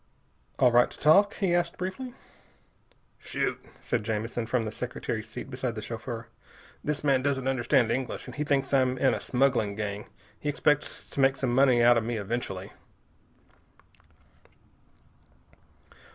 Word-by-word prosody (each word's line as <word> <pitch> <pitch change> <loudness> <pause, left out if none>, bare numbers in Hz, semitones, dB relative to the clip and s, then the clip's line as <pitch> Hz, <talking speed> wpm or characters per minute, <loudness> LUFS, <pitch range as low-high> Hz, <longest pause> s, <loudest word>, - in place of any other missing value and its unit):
"All 125 -2 +5
right 120 +1 +5
to - - -9
talk?" 200 +7 +5
he 190 -4 0
asked 175 -1 0
briefly. 215 +8 -5 1.0
"Shoot," - - -3 0.2
said - - -1
Jamison 115 +1 -2
from 115 -1 0
the 110 - -3
secretary's 115 -2 -4
seat - - -7
beside 125 -2 -3
the 110 - -5
chauffeur. 115 0 -6 0.6
"This 150 0 -2
man 135 -3 +3
doesn't 135 -1 -1
understand 130 -2 +2
English, 125 0 -3
and - - -9
he 150 - -2
thinks 140 -2 0
I'm 130 -1 +3
in 130 +1 +3
a - - -2
smuggling 125 -6 +1
gang. 105 -1 -4 0.3
He 150 - -2
expects 150 0 0
to - - -5
make 135 0 +4
some 130 -3 -1
money 125 -2 +5
out 120 0 +6
of - - -5
me 115 0 -2
eventually." 100 -3 -4
125 Hz, 150 wpm, -28 LUFS, 115-140 Hz, 1.0 s, out